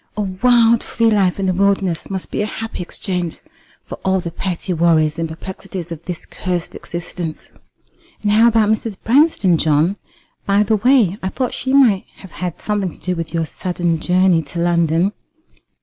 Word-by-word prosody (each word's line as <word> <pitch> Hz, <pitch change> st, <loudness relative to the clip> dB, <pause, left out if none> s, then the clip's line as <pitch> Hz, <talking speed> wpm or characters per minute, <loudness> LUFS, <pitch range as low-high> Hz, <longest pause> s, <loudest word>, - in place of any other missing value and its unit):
A -, -, 0 dB
wild 230 Hz, +4 st, +3 dB
free 230 Hz, -1 st, +1 dB
life 195 Hz, -3 st, +2 dB
in 195 Hz, -, 0 dB
the 185 Hz, -, +1 dB
wilderness 195 Hz, -3 st, 0 dB
must 190 Hz, -2 st, -5 dB
be -, -, -1 dB
a 210 Hz, -, -1 dB
happy 225 Hz, -1 st, -6 dB
exchange 180 Hz, -1 st, -3 dB, 0.5 s
for -, -, -8 dB
all 190 Hz, 0 st, +2 dB
the 170 Hz, -2 st, -5 dB
petty 180 Hz, +1 st, -3 dB
worries 160 Hz, -2 st, +2 dB
and 165 Hz, -1 st, -2 dB
perplexities 185 Hz, +1 st, -7 dB
of 165 Hz, 0 st, -7 dB
this 175 Hz, -2 st, -5 dB
cursed 180 Hz, -2 st, -4 dB
existence." 170 Hz, -1 st, -6 dB, 0.7 s
"And 205 Hz, -, +2 dB
how 220 Hz, +3 st, +6 dB
about 225 Hz, -2 st, +3 dB
Mrs. 220 Hz, -2 st, -2 dB
Branston, 230 Hz, -, +3 dB
John? 160 Hz, +6 st, +2 dB, 0.5 s
By 200 Hz, +1 st, +4 dB
the 215 Hz, +1 st, +1 dB
way, 225 Hz, -4 st, +3 dB
I 190 Hz, -, -2 dB
thought 250 Hz, +4 st, -2 dB
that -, -, -11 dB
she 260 Hz, -, -3 dB
might 245 Hz, -9 st, +4 dB
have 190 Hz, -, -13 dB
had 180 Hz, -1 st, -5 dB
something 205 Hz, -3 st, -1 dB
to -, -, -15 dB
do 180 Hz, 0 st, -2 dB
with 165 Hz, -1 st, -5 dB
your 165 Hz, -1 st, -1 dB
sudden 175 Hz, 0 st, -2 dB
journey 180 Hz, 0 st, +3 dB
to 160 Hz, +3 st, -7 dB
London." 170 Hz, +1 st, +2 dB
185 Hz, 180 wpm, -19 LUFS, 170-210 Hz, 0.7 s, how